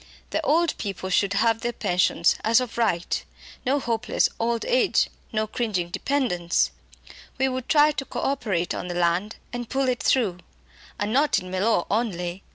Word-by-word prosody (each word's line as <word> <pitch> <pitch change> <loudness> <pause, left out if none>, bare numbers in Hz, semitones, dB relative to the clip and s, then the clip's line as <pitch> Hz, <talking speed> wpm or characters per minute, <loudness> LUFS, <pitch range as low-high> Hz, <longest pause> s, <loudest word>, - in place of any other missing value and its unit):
The - - 0
old 335 +3 +2
people 190 -2 -4
should 200 +1 +2
have 225 +2 +2
their 240 - -1
pensions 175 -4 +2
as 225 +2 +5
of 250 -2 -4
right. 180 -7 0 0.4
No 280 +3 +3
hopeless 235 -1 0
old 230 0 0
age, - - +2 0.2
no 215 0 0
cringing 210 -6 -2
dependence! 180 -7 0 0.7
We 265 +1 +2
would 255 -1 -4
try 300 0 +6
co 275 -2 -5
operation 205 -11 -1
on - - -5
the 175 - -4
land, 175 +5 +1 0.2
and 240 -1 -5
pull 270 0 0
it 250 -1 0
through. 205 -9 +2 0.6
And 205 +2 -1
not 290 +3 +3
in 185 0 -5
Mellor 185 0 +1
only. 190 -5 -1
225 Hz, 165 wpm, -25 LUFS, 185-255 Hz, 0.7 s, try